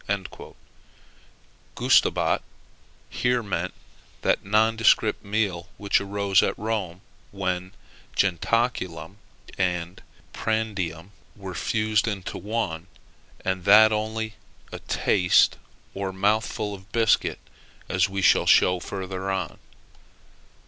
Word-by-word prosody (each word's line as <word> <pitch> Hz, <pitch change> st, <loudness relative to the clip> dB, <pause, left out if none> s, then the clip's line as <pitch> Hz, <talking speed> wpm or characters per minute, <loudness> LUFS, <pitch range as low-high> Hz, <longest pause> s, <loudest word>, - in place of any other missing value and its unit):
Gustabat -, -, +3 dB, 0.7 s
here 125 Hz, -1 st, 0 dB
meant 100 Hz, -3 st, -3 dB, 0.5 s
that -, -, +1 dB
nondescript 110 Hz, +1 st, +3 dB
meal 100 Hz, -4 st, -2 dB
which 100 Hz, -1 st, +1 dB
arose 100 Hz, -1 st, +2 dB
at -, -, -1 dB
Rome 100 Hz, -5 st, -3 dB, 0.3 s
when 95 Hz, -2 st, -3 dB, 0.4 s
jentaculum 95 Hz, -3 st, 0 dB, 0.4 s
and 90 Hz, -1 st, -2 dB, 0.3 s
prandium 100 Hz, -6 st, -2 dB, 0.2 s
were 95 Hz, -3 st, -8 dB
fused 110 Hz, +3 st, 0 dB
into 100 Hz, -4 st, -4 dB
one, 100 Hz, -6 st, -3 dB, 0.6 s
and 95 Hz, -1 st, -1 dB
that 110 Hz, +2 st, +8 dB
only 110 Hz, 0 st, -2 dB, 0.4 s
a -, -, -6 dB
taste 90 Hz, -2 st, +2 dB, 0.3 s
or 95 Hz, -1 st, -3 dB
mouthful 105 Hz, +2 st, 0 dB
of 95 Hz, +1 st, -12 dB
biscuit, 115 Hz, -2 st, +2 dB, 0.5 s
as 90 Hz, +1 st, +1 dB
we 95 Hz, 0 st, -3 dB
shall -, -, +4 dB
show 90 Hz, 0 st, +5 dB
farther 95 Hz, +1 st, -5 dB
on. 95 Hz, -3 st, -3 dB
100 Hz, 95 wpm, -25 LUFS, 95-110 Hz, 0.7 s, that